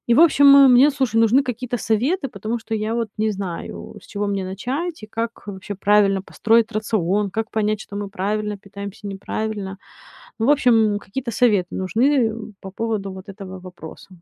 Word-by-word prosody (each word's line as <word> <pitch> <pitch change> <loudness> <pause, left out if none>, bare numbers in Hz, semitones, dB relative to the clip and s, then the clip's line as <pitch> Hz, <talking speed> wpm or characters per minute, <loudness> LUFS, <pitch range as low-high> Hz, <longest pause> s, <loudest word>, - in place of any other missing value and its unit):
И 235 - +5
в 295 - +5
общем, 285 -4 +6
м, 275 -2 +8
мне, 265 +4 +6
слушай, 265 -5 -1
нужны 230 +4 +4
какие-то 250 0 -3
советы, 265 - 0
потому 220 +3 -4
что 225 0 -5
я 215 +1 -2
вот 230 -1 -1
не 220 0 +1
знаю, 190 -4 -6
с - - -17
чего 205 0 -3
мне 195 -1 -2
начать 260 - -4
и 215 - -7
как, 230 +1 -5
э, - - -4
вообще 190 +1 -7
правильно 200 -1 +3
построить 225 +3 +2
рацион? 205 -2 0
Как 220 +3 -3
понять, 215 -1 0
что 200 - -9
мы 205 0 -4
правильно 210 +2 -2
питаемся, 200 +1 -9
неправильно? 200 0 -4 0.6
Ну, 225 - 0
в - - +4
общем, 225 -7 +3
какие-то 235 +5 -5
советы 210 -6 +2
нужны, 190 +5 -1 0.3
э, 220 - -6 0.3
по 190 - -8
поводу 205 -2 -3
вот 190 +1 -11
этого 190 -2 -9
вопроса. 180 -3 -11
215 Hz, 190 wpm, -21 LUFS, 195-235 Hz, 0.6 s, м